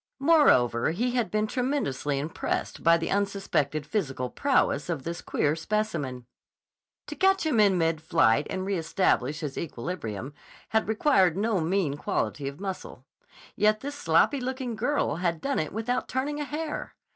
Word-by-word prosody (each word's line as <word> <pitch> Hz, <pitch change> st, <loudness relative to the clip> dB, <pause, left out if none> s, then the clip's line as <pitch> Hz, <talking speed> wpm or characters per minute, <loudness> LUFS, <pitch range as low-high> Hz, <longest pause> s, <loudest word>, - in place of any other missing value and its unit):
Moreover, 270 Hz, -, +4 dB
he 230 Hz, +10 st, 0 dB
had 240 Hz, -3 st, 0 dB
been 215 Hz, 0 st, +1 dB
tremendously 245 Hz, -, -1 dB
impressed 150 Hz, +4 st, -3 dB
by 165 Hz, 0 st, +5 dB
the 165 Hz, -, -3 dB
unsuspected 195 Hz, -7 st, 0 dB
physical 135 Hz, -, -2 dB
prowess 260 Hz, -, +1 dB
of 160 Hz, -6 st, -2 dB
this 170 Hz, +1 st, -5 dB
queer 150 Hz, +1 st, 0 dB
specimen. 160 Hz, -, -2 dB, 0.8 s
To -, -, -7 dB
catch 385 Hz, -2 st, +3 dB
him 285 Hz, -8 st, +2 dB
in 200 Hz, -3 st, +5 dB
mid 165 Hz, -2 st, +1 dB
flight 155 Hz, -6 st, +3 dB
and 185 Hz, 0 st, -3 dB
reëstablish 165 Hz, -5 st, 0 dB
his 145 Hz, -3 st, -4 dB
equilibrium 130 Hz, -, -5 dB, 0.4 s
had 220 Hz, 0 st, +1 dB
required 210 Hz, -, +3 dB
no 210 Hz, -1 st, +1 dB
mean 165 Hz, -4 st, 0 dB
quality 145 Hz, -1 st, -2 dB
of 140 Hz, +3 st, -6 dB
muscle. 195 Hz, -1 st, -6 dB, 0.5 s
Yet 215 Hz, 0 st, +2 dB
this 285 Hz, +1 st, -5 dB
sloppy 270 Hz, -, +2 dB
looking 255 Hz, -2 st, -3 dB
girl 235 Hz, -, 0 dB
had 170 Hz, -2 st, -1 dB
done 275 Hz, -, -1 dB
it 155 Hz, -, -2 dB
without 235 Hz, +4 st, -2 dB
turning 285 Hz, +3 st, -2 dB
a 295 Hz, -, -2 dB
hair! 300 Hz, +1 st, -5 dB
190 Hz, 155 wpm, -27 LUFS, 150-245 Hz, 0.8 s, by